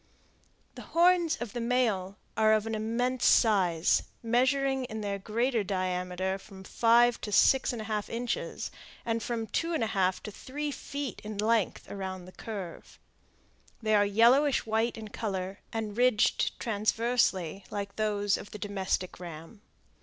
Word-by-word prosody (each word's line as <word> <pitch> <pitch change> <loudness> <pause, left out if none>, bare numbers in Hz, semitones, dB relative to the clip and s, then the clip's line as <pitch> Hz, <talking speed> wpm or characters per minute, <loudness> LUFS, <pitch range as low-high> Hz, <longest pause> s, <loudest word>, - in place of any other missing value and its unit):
The - - -9
horns 345 -1 +3
of 240 -4 -5
the 240 - -3
male 225 -6 0 0.2
are 220 0 +4
of 215 0 +2
immense 230 +3 -1
size, 185 -7 +4 0.2
measuring 260 +3 +2
in 220 -3 -6
their 200 -1 -3
greater 230 +3 0
diameter 185 0 -2
from 190 -1 -13
five 235 +3 +3
to 210 - -5
six 265 +6 +4
and 230 -3 -5
a - - -8
half 215 -1 -2
inches, 240 +1 -3 0.3
and 230 0 -1
from 230 0 -2
two 330 - -1
and 275 - 0
a 220 - -2
half 185 -2 +1
to 210 - -6
three 290 +7 -5
feet 280 -2 -5
in 215 -1 -6
length 220 -1 +1
around 190 -2 -6
the 185 - -12
curve. 195 -5 -8 0.8
They 215 -1 0
are 205 -1 +5
yellowish 240 +8 +4
white 225 +1 0
in 220 -1 -7
color, 195 -3 -4
and 220 -2 -3
ridged 245 -2 +2
transversely, 215 -4 0
like 200 -1 -5
those 205 -2 +1
of - - -9
the - - -8
domestic 190 -3 -2
ram. 170 +4 -9
215 Hz, 155 wpm, -29 LUFS, 195-240 Hz, 0.8 s, are